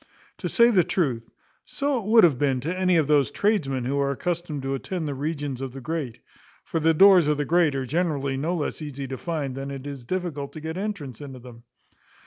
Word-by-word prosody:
To - - -3
say 235 0 +5
the 185 -5 +4
truth, 140 -10 -1 0.3
so 280 -2 -1
it 205 - -7
would 225 0 +6
have 150 -8 +4
been 135 -3 +1
to 165 +7 -2
any 185 -1 +2
of 160 - +3
those 145 -2 +3
tradesmen 140 - 0
who 140 +3 0
are 140 0 +1
accustomed 160 0 -3
to 135 0 -2
attend 160 +4 -3
the 145 - -2
regions 145 -2 -3
of 135 -2 -5
the 135 - -7
great; 135 -5 -4 0.4
for 165 - -2
the 160 +1 +3
doors 190 -2 +7
of 150 -1 +2
the 145 - -1
great 165 -3 +3
are 135 -1 -2
generally 145 -2 -1
no 160 +7 -1
less 155 -1 -3
easy 140 -2 -5
to 130 0 -5
find 155 -6 -3
than 135 +1 -5
it 135 -1 -7
is 140 -3 -7
difficult 155 -2 -4
to 155 - -7
get 160 +1 -5
entrance 185 - -5
into 135 -3 -8
them. 120 -1 -13
150 Hz, 225 wpm, -25 LUFS, 135-175 Hz, 0.4 s, doors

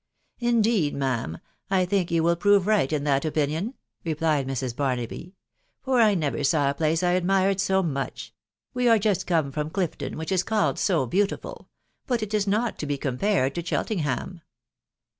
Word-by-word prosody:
" - - -44
Indeed, 220 -9 +2
ma'am, 125 - -2 0.3
I 190 -2 +2
think 180 -1 0
you 165 -1 +1
will 170 +1 +3
prove 200 +2 +3
right 205 -10 +2
in 150 -2 -1
that 140 -2 +1
opinion/* 160 - -1 0.3
replied 155 -4 0
Mrs. 130 -2 -3
Barnaby, 135 - -3 0.2
" - - -46
for 260 -2 +2
I 215 -3 +5
never 150 -4 -1
saw 140 0 +2
a - - -4
place 160 +3 0
1 175 0 +3
admired 190 +1 +2
so 190 0 +2
much. 135 -5 -4 0.4
We 250 -1 +1
are 225 - +6
just 205 -3 0
come 160 -5 +1
from 150 +1 -3
Clifton, 180 -1 -3
which 160 +3 -5
is 185 -2 +3
called 215 +1 0
so 170 -9 +2
beautiful,.... 195 - -2 0.4
but 240 -4 0
it 215 0 -5
is 210 -1 +1
not 215 +3 0
to 150 - -3
be 145 -1 -1
compared 135 +1 0
to 170 - -3
Chel 175 - -1
tenham." 170 - -3
170 Hz, 185 wpm, -25 LUFS, 145-200 Hz, 0.4 s, are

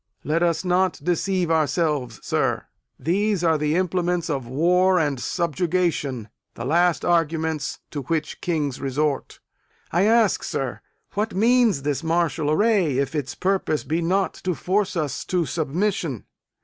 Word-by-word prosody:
Let 155 +3 0
us 170 +1 +1
not 180 0 +2
deceive 180 +1 0
ourselves, 150 -5 0
sir. - - 0 0.3
These 190 +5 0
are 160 -2 +3
the 150 +1 +1
implements 180 -2 0
of 135 -4 -3
war 180 +7 +3
and 145 -6 0
subjugation 165 - -1 0.3
the 115 - -5
last 170 +4 +2
arguments 160 -3 0
to 145 - -4
which 155 +3 -3
kings 150 -6 -1
resort. 140 +1 -1 0.5
I 175 +4 +3
ask, 225 -2 +3
sir, 135 -3 -3 0.3
what 210 -1 -2
means 230 - +3
this 145 0 -1
martial 165 -3 0
array, 180 - +2
if 140 +3 0
its 145 -4 -3
purpose 185 -5 0
be 160 +3 -1
not 190 +3 +1
to 180 -2 0
force 190 +4 0
us 150 -4 -2
to 180 -3 0
submission? 160 - -2
165 Hz, 140 wpm, -23 LUFS, 150-185 Hz, 0.5 s, are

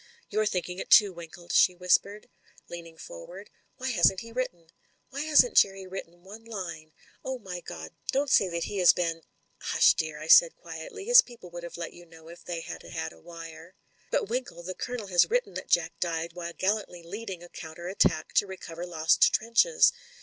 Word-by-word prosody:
"You're 215 0 +1
thinking 180 -2 -3
it - - -6
too, 205 -4 +7
Winkle," 170 0 -12
she 180 - +4
whispered, 195 +3 +1 0.4
leaning 165 -1 -10
forward. - - -11 0.3
"Why 260 +1 -3
hasn't 185 -2 +3
he 230 - -11
written? 175 -10 -5 0.4
Why 275 +2 -4
hasn't 310 +10 +4
Jerry 195 -1 +4
written 175 -2 -9
one 210 +4 -12
line? 180 -8 -7 0.3
Oh, 260 0 -3
my 190 -6 -7
God! 80 - -9 0.2
don't 275 +1 0
say 195 - +5
that 170 -1 -3
he 205 - -4
has 180 -2 +6
been 165 -2 -2 0.2
" - - -41 0.2
"Hush, - - +6
dear!" 155 -2 -4
I 155 - -7
said 165 +1 +7
quietly. 165 - -9
"His 485 +1 +8
people 230 -8 -14
would 175 0 -7
have 170 0 -8
let 170 - -6
you 175 0 -15
know 165 0 -15
if 170 - -13
they 170 -2 -5
had - - -8
had 80 +1 -6
a 80 - -18
wire." 165 - -11 0.3
"But, - - 0
Winkle, 230 -7 -4
the 185 +2 -5
Colonel 245 +2 -5
has 180 -3 +3
written - - 0
that - - -7
Jack 170 -1 +2
died 165 -1 -2
while 170 -1 -6
gallantly 190 -3 -1
leading 190 0 -7
a 175 - -12
counter 165 +2 -9
attack 190 - +1
to 205 - +4
recover 175 -2 -8
lost 160 -2 +3
trenches. 235 - +3
180 Hz, 195 wpm, -28 LUFS, 170-215 Hz, 0.4 s, His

